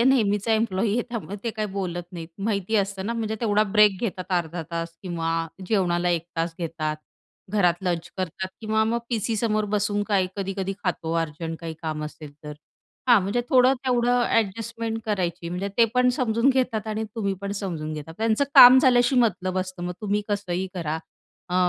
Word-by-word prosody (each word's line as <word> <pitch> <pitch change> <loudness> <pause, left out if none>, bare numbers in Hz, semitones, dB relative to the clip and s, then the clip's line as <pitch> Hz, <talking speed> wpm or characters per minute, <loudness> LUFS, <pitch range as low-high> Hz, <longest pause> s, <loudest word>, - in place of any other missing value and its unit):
आहे 235 - +4
नेहमीचा 215 -4 +2
एम्प्लॉयी 215 -2 +1
आहे 240 - +1
त्यामुळे 210 -4 -5
ते 230 - 0
काही 215 -1 -3
बोलत 180 -3 -3
नाहीत. 165 -2 -7
माहिती 205 +1 0
असतं 195 -1 -1
ना, 230 - -1
म्हणजे 220 -1 -2
तेवढा 210 -2 +3
ब्रेक 210 -3 +5
घेतात 190 -5 -3
अर्धा 170 -1 -1
तास 165 0 -4
किंवा 170 -3 -2 0.4
जेवणाला 180 -4 +1
1 170 -1 0
तास 165 0 -1
घेतात. 160 -2 -3 0.6
घरात 180 -5 +3
लंच 175 -2 -2
करतात 185 0 -3
किंवा 220 0 +1
मग 230 +2 0
पीसीसमोर 220 -1 0
बसून 205 0 +1
काही 195 -3 +2
कधी-कधी 195 -1 -2
खातो 165 -2 -1
अर्जंट 160 +1 -4
काही 165 -1 -5
काम 155 -1 -3
असेल 150 -1 -9
तर. 150 - -6 0.6
हां, 235 -4 +7
म्हणजे 200 +6 0
थोडं 260 -1 +5
तेवढं 245 0 +3
अ‍ॅडजस्टमेंट 225 +1 -1
करायची, 180 -4 -2
म्हणजे 180 +3 -3
ते 235 - +8
पण 250 0 +4
समजून 230 +1 +2
घेतात 250 -5 0
आणि 220 0 -2
तुम्ही 200 -4 -1
पण 200 0 -3
समजून 160 -5 -4
घेतात. 155 +1 -7
त्यांचं 225 +4 +2
काम 250 +1 +11
झाल्याशी 255 0 +4
मतलब 185 -6 +1
असतं, 185 -1 -4
मग 180 - -2
तुम्ही 210 -1 0
कसंही 190 -3 -2
करा. 160 -2 -2 0.5
अ, 180 - -3
200 Hz, 175 wpm, -25 LUFS, 175-225 Hz, 0.6 s, काम